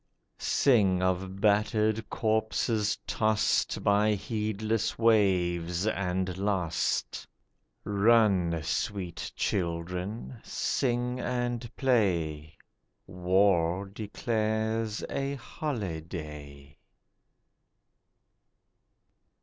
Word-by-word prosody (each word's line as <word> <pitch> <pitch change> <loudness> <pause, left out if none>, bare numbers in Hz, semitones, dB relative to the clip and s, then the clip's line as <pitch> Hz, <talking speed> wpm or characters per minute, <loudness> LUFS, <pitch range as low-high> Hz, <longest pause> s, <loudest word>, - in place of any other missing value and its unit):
Sing 100 -9 +3
of 95 +1 -1
battered 105 +1 +2
corpses 110 -1 0
tossed 110 -1 +1
By 105 +1 +3
the 105 - +2
heedless 110 +1 -2
waves, 90 -5 +2
and 95 -3 -1
lost. 95 -5 -1 0.6
Run, 100 -5 +3
sweet 90 +2 -3
children, 90 +6 -3
sing 125 -1 -1
and 120 -1 -2
play; 85 - 0 0.5
War 90 0 +2
declares 110 0 -1
a 140 0 -2
holiday. 80 - -6
100 Hz, 65 wpm, -29 LUFS, 90-110 Hz, 0.6 s, Sing